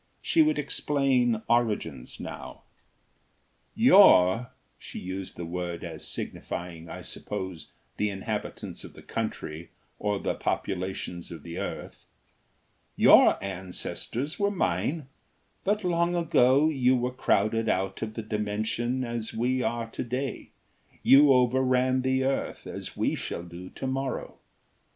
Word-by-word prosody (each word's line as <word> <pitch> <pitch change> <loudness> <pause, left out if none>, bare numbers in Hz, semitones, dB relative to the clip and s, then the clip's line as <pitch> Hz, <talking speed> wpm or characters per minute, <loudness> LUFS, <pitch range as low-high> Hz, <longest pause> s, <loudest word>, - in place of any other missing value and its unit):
She 330 - +4
would 310 -1 +3
explain 130 -6 +1
origins, 105 - 0
now. - - -8 1.1
"Your" 95 +7 +6 0.3
she - - -9
used 95 +1 -6
the 85 - -5
word 85 0 -4
as - - -7
signifying, 85 -1 -5
I - - -7
suppose, 95 -3 -6 0.3
the 105 - +1
inhabitants 105 +2 -5
of - - -11
the - - -14
country, 80 +2 -4 0.3
or 105 -1 0
the - - -1
populations 90 -2 -3
of 80 -4 -9
the 85 0 -6
earth - - -6 0.9
"your - - +7
ancestors 100 - -4
were 200 0 +3
mine, 145 - -1 0.6
but 210 +2 +1
long 175 0 +1
ago 150 -4 +4
you 130 -4 +3
were 125 0 0
crowded 115 -2 +1
out 95 0 -1
of 110 0 -4
the 115 - -4
Dimension 110 +4 -1
as 115 -2 -4
we 125 +3 +1
are 120 -1 -1
to - - -4
day, 125 +2 -4 0.5
you 140 +1 +7
overran 130 0 +3
the 130 0 +1
earth 135 +1 -2
as - - -7
we - - +1
shall 85 - -4
do 90 +1 -9
to - - -7
morrow. 135 0 -3
115 Hz, 130 wpm, -27 LUFS, 95-130 Hz, 1.1 s, your